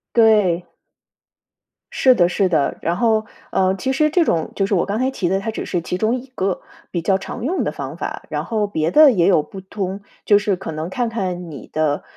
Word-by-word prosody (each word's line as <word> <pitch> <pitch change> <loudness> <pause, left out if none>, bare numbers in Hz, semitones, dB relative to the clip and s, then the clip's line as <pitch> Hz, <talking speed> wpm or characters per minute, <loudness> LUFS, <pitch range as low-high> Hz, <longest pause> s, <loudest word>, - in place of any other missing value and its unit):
对。 210 -7 +4 1.3
是 260 - +5
的 175 -5 +4
是 185 +1 +1
的， 155 -4 +1
然 170 +2 -1
后， 220 -2 +2 0.3
呃， 190 0 +2
其 260 +8 -2
实 305 +3 +2
这 335 +2 +3
种 165 - 0
就 195 - +1
是 200 - -2
我 180 - +2
刚 205 +3 -2
才 260 - +1
提 180 -9 -2
的， 190 +1 +1
它 225 +3 -3
只 - - -5
是 175 -2 -2
其 180 - -3
中 220 +5 +1
一 255 0 -6
个 190 -1 -1 0.3
比 170 - -2
较 190 +3 +2
常 225 +4 -7
用 355 +7 0
的 - - -1
方 - - -6
法。 - - -5
然 - - -2
后 215 -3 -1
别 160 -5 -1
的 300 +2 +8
也 175 -5 +2
有 180 -6 +4
不 195 - -10
通， 190 0 -5 0.2
就 205 - +6
是 205 -2 0
可 180 -2 -6
能 155 +2 -4
看 240 +5 -1
看 185 -6 -3
你 140 - -10
的， 155 -1 0
195 Hz, 240 characters per minute, -20 LUFS, 175-225 Hz, 1.3 s, 的